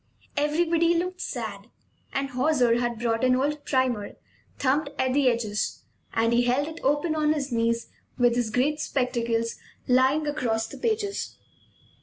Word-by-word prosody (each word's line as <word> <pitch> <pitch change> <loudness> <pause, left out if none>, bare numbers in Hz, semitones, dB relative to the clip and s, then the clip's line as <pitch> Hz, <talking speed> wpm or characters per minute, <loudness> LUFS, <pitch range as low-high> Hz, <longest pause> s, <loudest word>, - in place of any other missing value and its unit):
Everybody 330 +3 +2
looked 365 +2 -2
sad; - - -5 0.4
and 275 0 -2
Hauser 250 -3 +2
had 240 -1 -1
brought 225 +1 0
an 255 0 +4
old 290 +3 -1
primer, 255 -6 0 0.4
thumbed 285 +2 +1
at 260 -1 +1
the 275 -2 +4
edges, 220 -3 -2 0.3
and 230 +1 +1
he 240 - +4
held 260 +4 +1
it 320 +1 -7
open 295 +4 +1
on 305 -1 +2
his 285 -3 -3
knees 230 0 0 0.3
with 245 -1 +3
his 240 -2 0
great 270 +7 +1
spectacles 235 -5 -1 0.3
lying 260 +4 +3
across 230 -7 -1
the - - -10
pages. 430 -3 -2
260 Hz, 150 wpm, -26 LUFS, 235-300 Hz, 0.4 s, an